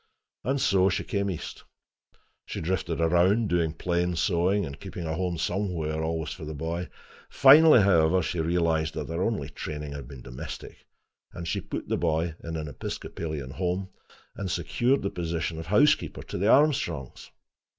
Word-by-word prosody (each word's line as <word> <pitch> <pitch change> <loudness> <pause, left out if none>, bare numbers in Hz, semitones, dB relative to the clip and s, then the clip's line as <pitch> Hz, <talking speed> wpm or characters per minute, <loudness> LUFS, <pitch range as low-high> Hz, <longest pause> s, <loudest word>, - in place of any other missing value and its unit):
And 135 +2 0
so 95 -4 +3
she 90 - -1
came 100 -1 -1
east. 90 - -6 0.8
She - - -5
drifted 85 -1 -2
around, 90 +7 +3
doing 85 -2 +1
plain 85 +1 -1
sewing 90 +3 +1
and 70 -2 -8
keeping 85 - -7
a 80 - -2
home 90 0 -2
somewhere 85 -5 -2
always 80 -1 -2
for 90 - -8
the 75 0 -6
boy. 85 +4 -3 0.4
Finally, 145 -1 +8
however, 90 -2 +4
she 85 - -2
realized 80 -1 +1
that 75 -1 -4
her 85 +2 -2
only 110 +2 -1
training 75 -1 -6
had 70 -3 -7
been 70 -3 -11
domestic, 65 -1 -9 0.5
and 85 -2 -6
she - - -1
put - - -6
the - - 0
boy 80 0 0
in 80 -1 -4
an 75 -1 -4
Episcopalian 75 -1 -5
home, 90 +4 -2 0.5
and 95 -1 -4
secured 120 - +1
the 100 - -1
position 85 -1 -3
of 80 - -7
housekeeper 135 - +3
to - - -6
the 100 - +1
Armstrongs. 130 - +2
85 Hz, 165 wpm, -27 LUFS, 80-95 Hz, 0.8 s, Finally